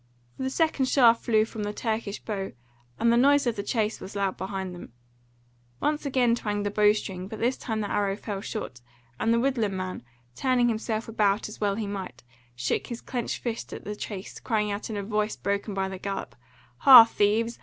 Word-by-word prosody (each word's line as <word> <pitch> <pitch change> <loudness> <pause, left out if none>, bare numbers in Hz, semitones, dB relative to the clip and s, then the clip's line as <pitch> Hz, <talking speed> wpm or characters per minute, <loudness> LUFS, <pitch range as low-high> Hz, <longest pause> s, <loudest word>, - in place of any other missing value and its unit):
For - - -9
the 260 - 0
second 310 -2 +1
shaft 235 -3 +5
flew 215 -2 +3
from 220 -1 -7
the 205 0 -3
Turkish 220 -2 -3
bow, 195 -3 -4 0.5
and 235 0 +4
the - - +4
noise 285 +3 +5
of 240 -2 0
the 200 - -3
chase 215 +1 -1
was 195 - -9
loud 195 -2 0
behind 190 -1 -4
them. 175 -9 -11 0.9
Once 300 -1 -1
again 250 -3 +3
twanged 205 -3 -2
the 205 - -1
bow 210 0 +5
string, 190 -3 -5
but 220 - -7
this 245 +4 +1
time 220 -2 -3
the 205 - -3
arrow 200 -1 +1
fell 205 -2 -5
short, 200 - -6 0.4
and 225 - +1
the 230 - +3
woodland 230 -7 0
man, 185 -5 -4 0.3
turning 250 - +2
himself 220 0 -2
about 210 -2 +1
as 215 - -11
well 205 -1 +2
as - - -5
he - - -2
might, 190 -12 -6 0.3
shook 125 - -1
his 235 -1 -5
clenched 245 -3 -4
fist 230 -2 -4
at - - -7
the 210 - -4
chase, 200 -1 -7
crying 210 -3 0
out 205 +3 -4
in 215 - -3
a 200 - -3
voice 210 +1 -1
broken 200 0 -2
by 190 0 0
the 190 -1 -7
gallop: 195 0 -4 0.4
"Ha, 255 - +10
thieves! 225 +2 +1
215 Hz, 210 wpm, -27 LUFS, 200-235 Hz, 0.9 s, Ha